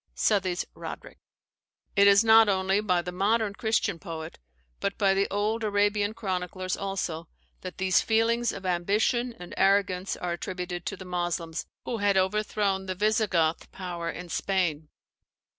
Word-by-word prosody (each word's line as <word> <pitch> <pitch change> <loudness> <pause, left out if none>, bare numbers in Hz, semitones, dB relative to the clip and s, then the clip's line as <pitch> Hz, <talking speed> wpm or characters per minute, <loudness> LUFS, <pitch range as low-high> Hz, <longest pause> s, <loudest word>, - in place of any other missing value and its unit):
SOUTHEY'S 190 -4 +1
RODERICK. - - -9 0.8
It 200 -1 +6
is 200 +2 +6
not 225 -1 +7
only 190 +1 +2
by 180 -4 +1
the 180 - -5
modern 205 +3 +1
Christian 205 -4 0
poet, 165 -3 -7 0.4
but 200 - -2
by 195 -2 +3
the 195 +1 +1
old 215 +3 -1
Arabian 205 0 +1
chroniclers 185 -2 -3
also, 185 -4 -3 0.3
that 185 - -7
these 185 -1 +3
feelings 230 +1 +2
of 195 -1 -8
ambition 210 +7 +1
and 175 - -10
arrogance 195 -1 +2
are 180 - -3
attributed 175 0 -5
to 200 - -3
the 185 - -9
Moslems, 175 -2 -3 0.2
who 235 - -2
had 200 -1 +2
overthrown 195 0 0
the 185 - -2
Visigoth 195 -6 +1
power 175 -3 -5
in 175 +1 -7
Spain. 165 -6 -1
195 Hz, 145 wpm, -27 LUFS, 180-205 Hz, 0.8 s, not